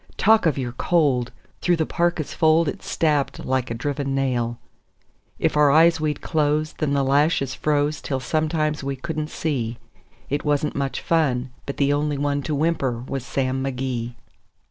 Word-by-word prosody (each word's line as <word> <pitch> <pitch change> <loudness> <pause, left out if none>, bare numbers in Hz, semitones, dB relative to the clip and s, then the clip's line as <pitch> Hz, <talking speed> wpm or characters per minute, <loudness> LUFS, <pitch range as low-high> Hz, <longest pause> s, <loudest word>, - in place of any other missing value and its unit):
Talk 220 -3 +4
of 150 - +1
your 125 -3 -2
cold! 130 -4 +1 0.3
through 175 - +3
the 160 -1 0
parka's 170 -3 -1
fold 160 +1 +3
it - - -3
stabbed 150 -4 0
like 130 -1 0
a 115 - -3
driven 140 +2 -2
nail. 120 -3 0 0.8
If - - 0
our 150 -1 +5
eyes 165 +2 +5
we'd 150 -2 -1
close, 155 -1 0
then 145 -2 -1
the 140 -1 +2
lashes 140 0 +2
froze 150 +1 0
till 135 -2 -2
sometimes 155 +1 -1
we 135 0 -2
couldn't 155 +2 -4
see; 125 -9 -2 0.5
It 145 +1 -2
wasn't 150 0 0
much 140 -1 -2
fun, 130 -6 +1 0.2
but 140 - -4
the 140 0 +2
only 145 0 0
one 145 0 0
to 150 - +1
whimper 140 -5 0
was 135 -2 -3
Sam 130 0 -1
McGee. 125 -3 -3
145 Hz, 165 wpm, -23 LUFS, 135-155 Hz, 0.8 s, our